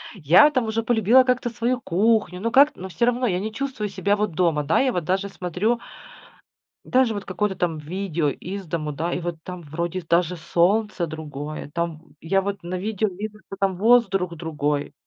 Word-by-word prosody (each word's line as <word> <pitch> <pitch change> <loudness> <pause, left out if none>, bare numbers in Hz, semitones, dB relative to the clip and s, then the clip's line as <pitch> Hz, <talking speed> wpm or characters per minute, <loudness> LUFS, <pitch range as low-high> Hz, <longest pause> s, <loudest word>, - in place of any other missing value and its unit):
Я 180 - +6
там 255 -5 0
уже 220 +1 -1
полюбила 235 +2 +5
как-то 250 -1 0
свою 240 +2 -1
кухню, 205 -1 +1
но 230 - 0
как-то 280 -1 +5
но 190 +1 -6
всё 235 +6 0
равно 245 0 +1
я 180 -2 0
не 215 +2 -4
чувствую 255 -5 -3
себя 200 +1 0
вот 210 -2 -1
дома, 160 -3 +1
да. 155 +3 +2
Я 265 -1 +2
вот 175 -6 -2
даже 190 +4 -1
смотрю 195 +6 -1 1.0
даже 255 -3 +2
вот 205 -1 -5
какое-то 190 +1 -2
там 170 -3 -1
видео 165 0 -2
из 190 +6 -6
дому, 155 -2 -3
да, 165 +4 -3
и - - -1
вот 170 -1 -4
там, 180 -1 -7
вроде, 170 +4 -4
даже 170 +1 +1
солнце 175 +3 +1
другое 150 -1 -7
там. 170 -2 -3 0.2
Я 195 +4 +1
вот 200 +1 -4
на 175 +2 -4
видео 215 +2 -1
вижу, 210 +3 -6
что - - -7
там 195 -2 0
воздух 195 -5 +3
другой. 150 -3 -2
185 Hz, 190 wpm, -23 LUFS, 170-220 Hz, 1.0 s, Я